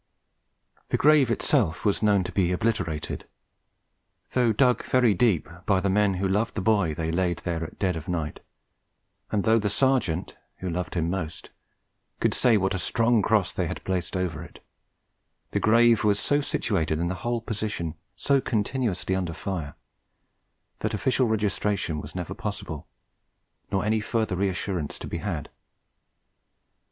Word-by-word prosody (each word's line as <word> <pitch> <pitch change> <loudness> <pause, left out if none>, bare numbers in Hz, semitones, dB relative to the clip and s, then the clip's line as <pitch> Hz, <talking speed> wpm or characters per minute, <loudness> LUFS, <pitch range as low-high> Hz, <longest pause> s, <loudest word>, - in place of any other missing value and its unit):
The - - +1
grave 150 -4 +5
itself 115 - +1
was 100 - +2
known 100 -3 +3
to - - -5
be 90 -3 +1
obliterated. 90 -6 -2 1.0
Though 125 -3 +3
dug 125 +1 +3
very 125 -4 +3
deep 100 -4 +2 0.2
by 95 -3 +4
men 100 0 +3
who 95 +2 0
loved 105 +4 0
the 105 - -1
boy 100 -7 +2
they 80 0 -2
laid 90 0 +1
there 85 -2 -1
at 80 - -8
dead 95 -3 0
of 80 +1 -6
night, 80 -5 -3 0.9
and 100 -2 0
though 115 0 +4
the 105 -1 0
Sergeant 110 -8 +1 0.2
(who 95 -1 -4
loved 90 +2 -3
him 85 0 0
most) 90 -5 -5 0.7
could - - +2
say 115 -3 +4
what 95 0 0
a 95 - -1
strong 115 +5 +2
cross 105 -2 +2
they - - -1
had - - -5
placed 95 -1 -2
over 85 -4 -2
it, 85 - -13 0.9
the - - +1
grave 115 +1 +5
was 105 -1 +3
so 145 0 +2
situated, 85 - 0
and 85 +2 -1
the 95 - -6
whole 120 0 0
position 105 -7 -3 0.2
so 135 +5 +2
continuously 110 -5 -1
under 90 -3 -1
fire, 80 -6 -4 1.0
that - - -1
official 130 +3 +1
registration 105 -6 0
was 75 +4 -10
never 90 +1 -4
possible, 100 -8 -5 0.8
nor 95 +1 0
any 110 +1 +2
further 110 -2 -1
reassurance 95 -4 -2
to - - -7
be 85 - -4
had. 85 -5 -4
100 Hz, 155 wpm, -26 LUFS, 85-110 Hz, 1.0 s, grave